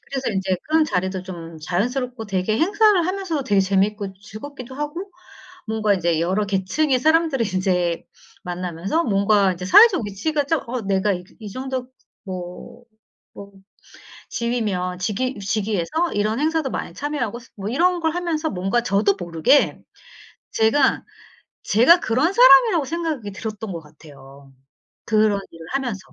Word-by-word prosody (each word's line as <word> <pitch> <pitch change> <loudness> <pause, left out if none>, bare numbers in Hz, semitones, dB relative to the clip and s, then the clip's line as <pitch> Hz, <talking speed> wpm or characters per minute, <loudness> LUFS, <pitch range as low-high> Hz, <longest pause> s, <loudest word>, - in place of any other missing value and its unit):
그래서 265 -3 -2
인제 190 -2 -1
그런 315 0 +3
자리도 190 -6 -2
좀 170 -3 -9
자연스럽고 240 - -2
되게 195 +3 -1
행사를 405 0 +3
하면서도 370 -7 -2
되게 200 -5 +3
재밌고 195 +1 0
즐겁기도 255 +5 -10
하고 315 +7 -5 0.6
뭔가 215 -2 +1
이제 170 -3 0
여러 190 +5 0
계층의 205 +9 +1
사람들을 315 -3 +2
인제 180 -3 0 0.4
만나면서 180 - -2
뭔가 200 -2 +3
이제 180 +1 -7
사회적 370 - +6
위치가 290 +10 -1
좀 310 +1 0
어 250 0 -2
내가 195 +1 +1
이 180 -1 -4 0.2
이 210 - -7
정도 260 +2 -4 0.4
뭐 185 +5 -8 0.5
뭐 200 0 -11 0.8
지위면 205 -7 -2
직위 215 +4 -2
직위에서 215 - -1
이런 210 +3 0
행사도 310 -2 0
많이 - - -5
참여하고 260 -6 -3
스 245 - -19
뭐 200 +1 -5
이런 350 +8 +2
걸 320 -1 0
하면서 335 -3 -1
뭔가 195 +5 -1
저도 200 -1 +2
모르게 175 - +2 0.7
제가, 245 +5 +2 0.6
제가 265 - +5
그런 265 - +1
사람이라고 465 - +6
생각이 315 -10 -3
들었던 215 +1 -6
것 170 - -4
같아요, 140 -3 -16 0.5
그런 215 -2 +2
일을 165 -1 -12
하면서. 245 -8 -2
215 Hz, 315 characters per minute, -22 LUFS, 190-290 Hz, 0.8 s, 사회적